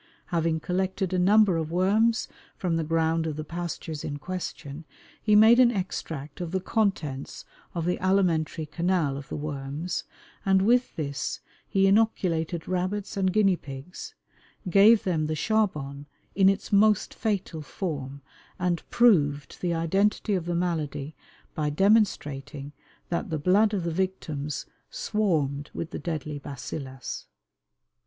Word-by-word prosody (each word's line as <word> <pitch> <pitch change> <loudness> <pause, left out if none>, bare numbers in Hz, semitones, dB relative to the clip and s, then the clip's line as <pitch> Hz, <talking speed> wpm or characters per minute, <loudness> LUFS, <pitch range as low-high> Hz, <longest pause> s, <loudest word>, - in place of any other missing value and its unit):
Having 165 -1 +1
collected 190 +1 -1
a 185 - +2
number 200 -1 +5
of 160 -1 -2
worms 215 +6 +2 0.3
from 180 -3 -1
the 165 - 0
ground 160 0 +1
of 155 - -3
the 155 - -4
pastures 165 -2 -5
in 145 - -4
question, 160 -3 -6 0.4
he 210 -1 +3
made 220 +3 +7
an 250 -2 +7
extract 165 - -4
of 175 - -3
the 190 +2 -1
contents 185 - -2 0.3
of 170 -1 -1
the 180 - 0
alimentary 175 -5 +1
canal 170 -3 0
of 140 0 -8
the - - -4
worms, 145 +3 -4 0.4
and 190 -1 +3
with 245 +4 +2
this 140 -4 -3 0.3
he 195 -2 +2
inoculated 180 -6 +1
rabbits 185 +3 -2
and 190 -2 +1
guinea 195 -2 +4
pigs, 140 +3 -9 0.5
gave 205 +5 +6
them 165 -6 0
the 155 - -1
"charbon" 150 -9 -1 0.3
in 195 -1 +5
its 195 +1 -2
most 210 0 +4
fatal 195 -7 -2
form, 140 -4 -5 0.3
and 180 -2 0
proved 145 - +3
the 175 - 0
identity 195 +6 +1
of 180 -4 -1
the 175 0 -1
malady 160 -4 -2 0.4
by 150 -1 -1
demonstrating 145 -7 +1 0.4
that 170 +2 -2
the 160 - -1
blood 195 +8 +3
of 200 -4 -1
the 170 - -1
victims 155 -6 -3 0.2
swarmed 150 -10 -1
with 165 - -4
the - - -5
deadly 150 -3 -4
"bacillus." 135 -1 -7
170 Hz, 140 wpm, -27 LUFS, 150-195 Hz, 0.5 s, made